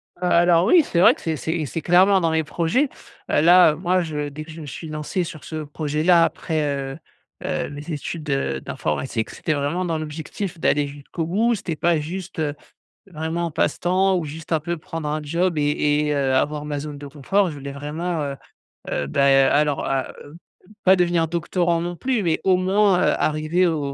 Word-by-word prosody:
Alors 175 -1 +3
oui, 325 - +6
c'est 170 - -1
vrai 180 - +7
que - - -15
c'est 160 -1 -1
c'est 160 +1 -2
c'est 160 +6 -4
clairement 185 +3 +5
dans 165 -1 +1
mes 160 0 +1
projets. 170 - 0 0.4
Heu, - - +3
là, 175 0 +7
heu, - - -6
moi 180 +2 +1
je 150 -3 -3
dès 150 +2 -7
que 160 - -11
je 160 +1 -9
me - - -8
suis 145 +4 -7
lancé 155 +4 -3
sur 155 -3 -8
ce 155 -1 -5
projet-là 155 +3 +2
après, 160 -1 -1
heu 140 -2 -3 0.5
heu, - - -2
mes 145 +3 -8
études, 155 +1 -5
heu, 70 - -1
d'informatique, 110 - -3
c'était 155 - -2
vraiment 150 +5 -1
dans 165 -2 -1
l'objectif 160 +4 -6
d'aller 145 -2 +2
jusqu'au 145 +4 -6
bout. 220 +7 +2
C'était 180 -6 -3
pas 165 +1 +2
juste, 175 +3 -6
heu, 150 -2 -1 0.5
vraiment 165 -1 -3
un - - -4
passe-temps 185 +5 +1
ou 175 - -1
juste 155 +3 -8
un 160 - +2
peu 170 +3 -3
prendre 160 -1 -6
un 155 +1 -1
job 170 +3 0
et 150 0 +1
et 150 - 0
heu, 135 -2 +1
avoir 150 +2 0
ma 150 -1 -3
zone 145 0 -6
de 145 0 -8
confort. 180 +8 0
Je - - -7
voulais 140 -1 -7
vraiment, 155 +4 -3
heu 140 -1 -4 0.5
heu, 70 - -1
bah, 140 - +2
heu, 135 0 +5
alors 145 -1 +1
à 135 -1 -1
heu, 145 +3 -13 0.3
p - - -23 0.2
pas 190 - +7
devenir 175 -2 +2
doctorant 170 0 0
non 175 +1 -4
plus, 250 +2 -1
mais 165 -3 0
au 190 -1 +4
moins, 190 0 +3
heu, - - +3
arriver 155 +4 +1
au 160 -4 -1
160 Hz, 210 wpm, -22 LUFS, 145-175 Hz, 0.5 s, vrai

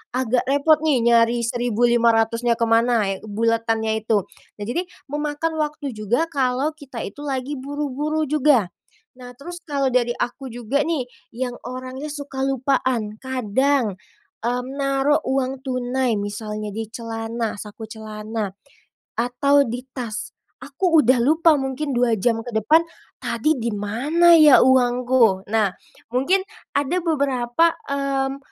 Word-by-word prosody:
agak 255 -1 +1
repot 285 +3 +4
nih 285 -7 +2
nyari 235 0 +4
Rp1.500-nya 235 -1 +2
ke 230 - +1
mana, 225 -4 +2
buletannya 225 0 0
itu. 215 -4 +1 0.3
Nah, 205 - -6
jadi 245 +11 -1 0.3
memakan 295 +2 -2
waktu 300 -2 -2
juga 215 +8 0
kalau 270 +1 0
kita 275 -6 -8
itu 205 - -9
lagi 270 0 -3
buru-buru 290 +2 -2
juga. 275 -9 +2 0.5
Nah, 245 0 -11
terus 345 +6 -8
kalau 275 -3 0
dari 240 -1 +2
aku 255 +3 -4
juga 245 +3 -1
nih, 320 -6 0 0.3
yang 250 0 -3
orangnya 255 +3 -6
suka 285 -2 -6
lupaan, 255 -5 0
kadang, 260 -3 0 0.4
mmm, 245 +1 -1
naruh 275 +1 +2
uang 265 0 -1
tunai 255 -2 -1
misalnya 210 +1 -4
di 220 +1 -4
celana, 225 0 -4
saku 210 +2 -9
celana, 215 -2 -5 0.6
atau 250 +4 +3
di 240 +2 -4 0.2
tas, 220 -4 -4 0.3
aku 350 -5 +2
udah 255 0 +4
lupa 315 +5 +4
mungkin 270 +2 -3
2 240 -1 +2
jam 225 +3 +1
ke - - -6
depan, 300 +10 +4 0.4
"Tadi 305 +6 0
di 235 -1 -2
mana 275 +12 +3
ya 300 -4 +8
uangku?" 245 -5 +3
Nah, 215 -2 +2 0.4
mungkin 330 +10 +2 0.3
ada 285 +5 0
beberapa, 280 -3 +1 0.2
mmm, 275 -1 -1
250 Hz, 130 wpm, -22 LUFS, 230-280 Hz, 0.6 s, ya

